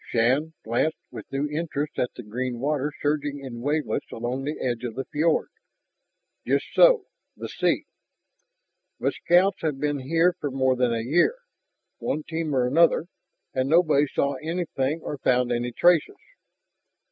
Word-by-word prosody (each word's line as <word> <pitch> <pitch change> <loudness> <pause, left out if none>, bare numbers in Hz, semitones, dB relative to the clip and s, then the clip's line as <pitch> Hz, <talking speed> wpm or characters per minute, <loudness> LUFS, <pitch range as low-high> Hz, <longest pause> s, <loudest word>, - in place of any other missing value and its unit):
Shann 130 +8 +1
glanced 120 +8 0
with - - -10
new 135 +2 -1
interest 150 -1 -3
at 125 - +1
the 120 - -8
green 120 +3 -3
water 145 +2 0
surging 145 -1 0
in 120 -2 -7
wavelets 150 +4 -1
along 125 +4 -3
the 150 +2 -3
edge 120 -2 -2
of 120 -3 -4
the 135 - -3
fiord. 160 +2 +1 0.9
"Just - - +1
so, - - +6 0.3
the - - -5
sea!" - - 0 1.1
"But - - 0
scouts 180 +3 +3
have 150 -4 -1
been 145 -1 -1
here 165 +6 +2
for 145 - -2
more 130 -1 +1
than 125 -1 +1
a 115 -1 -1
year, 175 - +3 0.6
one 155 - -2
team 160 -3 -3
or 125 -1 +3
another. 165 +5 +4 0.5
And 130 +1 0
nobody 155 -3 +4
saw 140 0 -1
anything 160 -3 -2
or 145 - -5
found 125 -1 +2
any 120 0 -1
traces." 175 - +3
145 Hz, 155 wpm, -25 LUFS, 130-160 Hz, 1.1 s, so